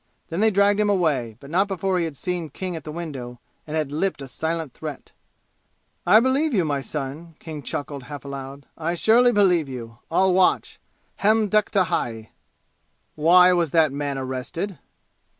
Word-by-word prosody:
Then 165 - -3
they 220 +1 +5
dragged 200 0 +3
him 210 -1 +2
away; 145 - 0
but 140 +1 -12
not 190 +4 +3
before 190 -1 -1
he 170 - 0
had 155 -4 -6
seen 175 -2 -3
King 180 +4 -5
at 160 - -8
the 155 - -5
window, 135 -7 -6 0.3
and 155 +1 -3
had 150 -3 -1
lipped 160 -1 -1
a - - -8
silent 160 0 -3
threat. 155 -3 -8 1.0
"I 215 - +8
believe 265 +3 +1
you, 180 -4 +2
my 145 -2 -1
son!" 150 +4 -6
King 155 -3 -8
chuckled, 140 -2 -5
half 145 +1 -8
aloud. 140 0 -7
"I 165 +2 -2
surely 235 +7 +5
believe 180 - +3
you! 115 -2 -8
I'll 190 -1 +3
watch! 185 0 +2 0.4
Ham 215 +1 +3
dekta 210 -2 +3
hai!" 115 - -3 0.8
"Why 180 +4 +6
was 170 -3 +1
that 160 -1 +3
man 140 0 -3
arrested?" 135 +9 -4
165 Hz, 170 wpm, -23 LUFS, 140-190 Hz, 1.0 s, I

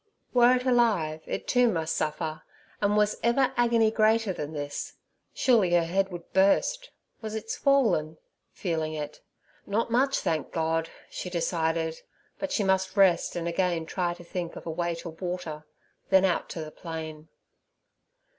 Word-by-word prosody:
Were 245 0 +6
it 250 0 -2
alive, 215 -12 +2
it - - -4
too 245 -1 +4
must 165 -3 -1
suffer, 155 +1 -2 0.4
and 205 0 +2
was 210 0 +2
ever 255 +3 +2
agony 230 -2 +3
greater 220 -2 +2
than 150 -3 -5
this? 145 -2 -5 0.4
Surely 220 -9 +3
her 170 - +4
head 190 +3 0
would 175 -2 -9
burst. 350 - +2 0.3
Was 220 -1 -5
it 220 +1 -5
swollen?—feeling 165 - -1
it. 150 -1 -6 0.5
Not 225 +3 0
much, 270 +3 +3
thank 165 -4 -1
God! 165 0 0 0.2
she 180 - -5
decided, 165 -2 -1 0.4
but 290 -1 -3
she 210 - +1
must 190 +1 +1
rest 190 -3 +4
and 170 -1 -2
again 170 -1 0
try 175 0 -2
to 175 - -12
think 170 0 -5
of - - -9
a 165 - -3
way 170 +1 -1
to 170 +1 -7
water—then 165 +2 -2
out 180 - 0
to 165 - -5
the 155 - -9
plain. 160 -2 -7
180 Hz, 155 wpm, -27 LUFS, 160-220 Hz, 0.5 s, Were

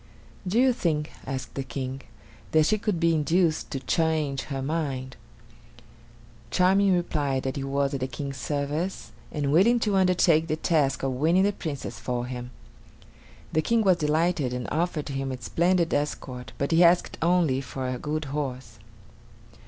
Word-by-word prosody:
"Do 205 +6 +2
you 260 0 +5
think," 155 -9 -1 0.2
asked 130 -1 -4
the 135 - -3
King, 130 0 -5 0.5
"that 155 -1 +5
she 215 +5 +2
could 200 -4 -1
be 165 0 +3
induced 160 +1 +1
to 135 - -3
change 150 -1 0
her 135 -2 -4
mind?" 135 -4 -3 1.3
Charming 190 +1 +4
replied 145 -6 -1
that 130 - -2
he 140 - -3
was 140 +1 0
at 140 - -1
the 130 - -2
King's 135 +2 -6
service 150 +7 -3 0.2
and 145 -2 -1
willing 215 +10 +5
to 210 -3 +1
undertake 180 -4 +3
the 155 - 0
task 150 -5 +1
of 135 - 0
winning 160 +8 +3
the 205 +1 +2
Princess 150 -7 -5
for 120 -1 -2
him. 125 -1 -6 1.0
The 155 - +3
King 230 +6 +2
was 185 -3 +4
delighted 155 -3 +1
and 125 -1 -4
offered 160 -3 -1
him 135 -1 -3
a 130 - -5
splendid 170 +6 +1
escort, 135 -3 -3
but 140 - -1
he 165 +2 +5
asked 175 +1 +3
only 165 -6 +2
for 130 -1 -5
a 125 -1 -3
good 155 +1 -3
horse. 130 -6 -4
150 Hz, 165 wpm, -26 LUFS, 135-170 Hz, 1.3 s, you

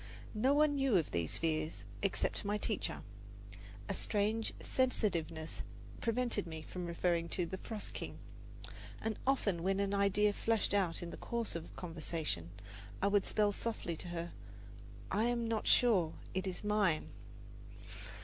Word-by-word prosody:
No 235 +5 +3
one 300 0 +5
knew 270 -7 +4
of 165 - 0
these 85 -3 0
fears 155 -1 -1 0.2
except 200 - 0
my 205 +1 +1
teacher. 210 0 -2 0.8
A - - -1
strange 215 +2 +1
sensitiveness 170 -11 0 0.4
prevented 240 -5 +1
me 160 -1 -6
from 180 -1 -5
referring 170 0 +1
to 180 0 0
the 190 +2 -5
"Frost 220 -2 -5
King"; - - -5 0.8
and 225 -1 -2
often 205 -10 +2
when 195 +2 +1
an 200 0 +1
idea 200 +1 +4
flashed 225 -1 +1
out 180 -4 +2
in 170 - -5
the - - -7
course 235 -5 -2
of 165 0 -6
conversation 160 - -3 0.5
I 200 - +3
would 200 -1 +3
spell 210 -1 +3
softly 205 -5 -2
to 180 - -6
her, 170 0 -4 0.8
"I 220 - +3
am 235 -1 +1
not 225 -1 -1
sure 190 -10 +5 0.2
it 190 +1 -1
is 185 +1 -4
mine." 205 -6 +2
200 Hz, 150 wpm, -35 LUFS, 170-220 Hz, 0.8 s, one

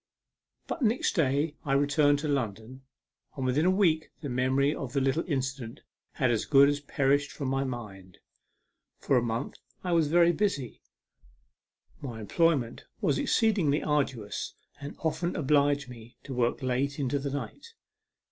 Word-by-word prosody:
But 325 - -5
next 230 0 +1
day 145 -1 +1
I 140 -4 -1
returned 145 +1 +3
to 155 - -2
London, 125 -2 -3 0.6
and 135 - -2
within 140 +7 +2
a - - +5
week 175 -5 +2
the 145 - -4
memory 130 +3 +1
of 130 -5 -6
the 140 - +2
little 135 +4 +1
incident 135 -4 -3 0.3
had 130 -4 +1
as 115 - 0
good 140 -1 +6
as 145 0 -1
perished 140 0 +1
from 135 -3 -4
my 135 +1 0
mind. 105 -8 -7 0.8
For 135 - 0
a 125 - +4
month 115 0 -3 0.2
I 180 - -2
was 165 -3 +3
very 170 +2 +5
busy. 170 - -2 1.2
My 120 -5 -6
employment 135 +1 0
was 165 -10 +1
exceedingly 190 -10 +2
arduous, 135 -8 -2 0.2
and 145 +1 -7
often 160 +2 -1
obliged 145 -1 +2
me 120 -1 -12
to 135 - -7
work 125 +1 0
late 130 +2 -1
into 140 -1 -1
the 140 +1 -3
night. 145 - -7
140 Hz, 155 wpm, -28 LUFS, 130-155 Hz, 1.2 s, good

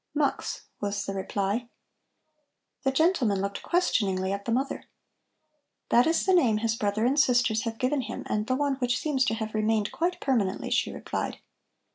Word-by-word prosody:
"Mux," 290 -1 -1 0.2
was 200 0 -2
the 195 - -3
reply. 200 +4 -2 1.1
The 270 - +1
gentleman 265 - +2
looked 200 +1 -3
questioningly 195 - +1
at 200 0 -5
the 235 - -2
mother. 265 +4 -1 1.0
"That 240 +4 +5
is 330 +1 +2
the 380 - +3
name 245 -12 +4
his 225 0 0
brother 210 +1 0
and 275 +4 +3
sisters 245 -5 +3
have 225 -1 -3
given 260 +3 +1
him - - -6
and 210 +1 -1
the 255 - +1
one 280 -1 0
which 245 -2 0
seems 280 -4 +1
to 225 - 0
have 220 -1 -4
remained 215 -1 +1
quite 350 +2 -1
permanently," 220 -8 0
she - - +1
replied. - - -4
230 Hz, 170 wpm, -27 LUFS, 205-270 Hz, 1.1 s, That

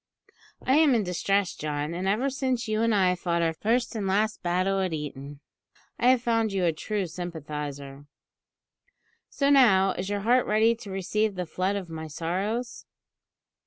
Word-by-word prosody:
I 265 +3 +4
am 305 -5 +5
in 220 - +2
distress, 195 +1 0
John, 150 +1 -3
and 180 +2 -3
ever 215 +7 +1
since 260 -3 -1
you 215 0 0
and 230 -1 +2
I 185 -2 +3
fought 170 -1 -1
our 165 -1 +1
first 230 +8 0
and 205 -3 -2
last 215 +3 0
battle 185 +2 0
at 185 -3 -1
Eton, 145 -1 -6 0.6
I 240 - +2
have 255 -1 +4
found 225 -2 +1
you 190 -2 0
a 165 - +2
true 205 +5 -3
sympathiser. 150 -5 -7 1.2
So 280 0 +1
now, 195 -9 +5
is 185 +1 -4
your 205 0 -2
heart 245 +4 +3
ready 220 +2 +4
to 225 -3 -10
receive 200 +2 -1
the 180 -1 -3
flood 185 +4 -1
of 195 -3 -4
my 160 -1 -7
sorrows?" 190 +10 -3
195 Hz, 170 wpm, -26 LUFS, 170-225 Hz, 1.2 s, am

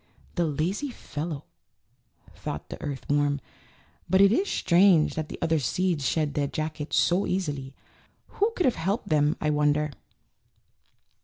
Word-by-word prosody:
"The 175 - +1
lazy 175 - -1
fellow," 150 - -6 0.9
thought - - -6
the - - -8
earth 140 -2 -5
worm; 145 0 +2 0.7
"but 190 +2 +4
it 200 0 +7
is 385 - +1
strange 175 -3 +4
that 155 -1 -4
the - - -6
other 160 -1 +2
seeds 160 +1 0
shed 150 0 0
their 145 -1 0
jackets 155 0 -3
so 180 +3 +3
easily. 145 -8 -3 0.5
Who 420 +3 0
could 360 - +1
have 255 - +4
helped 200 +7 -2
them 150 -1 +2
I 150 - +1
wonder?" 150 0 +2
155 Hz, 145 wpm, -27 LUFS, 145-185 Hz, 0.9 s, it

